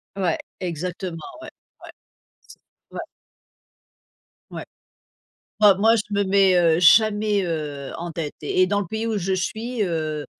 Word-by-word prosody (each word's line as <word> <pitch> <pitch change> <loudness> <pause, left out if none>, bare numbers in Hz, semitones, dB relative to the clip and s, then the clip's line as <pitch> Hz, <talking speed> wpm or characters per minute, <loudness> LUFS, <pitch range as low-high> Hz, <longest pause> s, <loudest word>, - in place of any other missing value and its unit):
Ouais, 185 -4 0 0.2
exactement, 180 0 -5 0.2
ouais. - - -9 0.3
Ouais - - -11 0.6
s - - -15 0.3
ouais. - - -5 1.5
Ouais, - - -6 1.0
moi 205 -3 +6
moi 225 +3 +4
je 210 - -1
me 200 0 +2
mets, 195 -1 +3
heu, 165 -1 +3
jamais, 210 +2 +4
heu, 150 -5 -4
en 170 +1 -5
dette 155 -2 -5
et 185 +5 +1
dans 205 +1 0
le 200 - -3
pays 220 +3 -4
où 220 -2 -1
je 190 0 -1
suis, 220 +5 -2
heu, 155 -4 -3
185 Hz, 145 wpm, -22 LUFS, 165-205 Hz, 1.5 s, moi